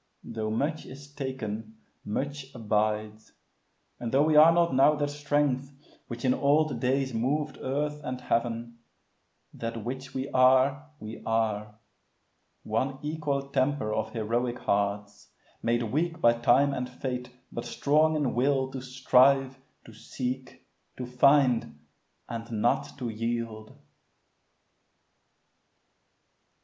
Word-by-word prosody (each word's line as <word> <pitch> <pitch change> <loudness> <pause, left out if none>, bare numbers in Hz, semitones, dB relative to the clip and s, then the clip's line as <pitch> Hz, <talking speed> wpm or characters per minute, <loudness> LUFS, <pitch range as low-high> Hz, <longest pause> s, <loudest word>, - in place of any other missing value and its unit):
Tho' 110 -1 -4
much 145 +8 -2
is 140 +2 -12
taken, 110 -6 -5 0.3
much 140 +4 -4
abides; 110 -1 -1 0.7
and 120 -2 -4
tho' 135 +2 +4
We 155 0 +2
are 155 +2 +9
not 170 -1 +2
now 135 +3 +5
that 145 -1 -1
strength 145 -2 0 0.4
which 120 +2 -6
in 125 - +4
old 150 +2 +2
days 130 0 0
Moved 145 +6 -1
earth 150 +3 -2
and 125 -2 -4
heaven, 115 -1 -2 0.7
that 115 -1 -5
which 130 +2 -6
we 130 +1 -2
are, 130 +3 +4
we 110 +1 -8
are, 105 -2 -1 0.9
One 135 0 -1
equal 150 -3 -2
temper 130 -5 0
of 110 0 -1
heroic 120 +2 -1
hearts, 100 0 -2 0.3
Made 120 +1 +1
weak 160 +9 -1
by 120 -6 +5
time 120 +4 +3
and 125 -2 -3
fate, 125 -1 -5 0.2
but 120 - -5
strong 155 +2 +2
in 145 -4 0
will 130 +1 +1
To 130 -1 -5
strive, 130 +1 +3 0.3
to 115 - -13
seek, 130 +3 -6 0.3
to 125 - -4
find, 125 0 +3 0.5
and 115 0 -6
not 120 +6 0
to 125 -3 -4
yield. 115 -1 -4
130 Hz, 120 wpm, -28 LUFS, 115-140 Hz, 0.9 s, are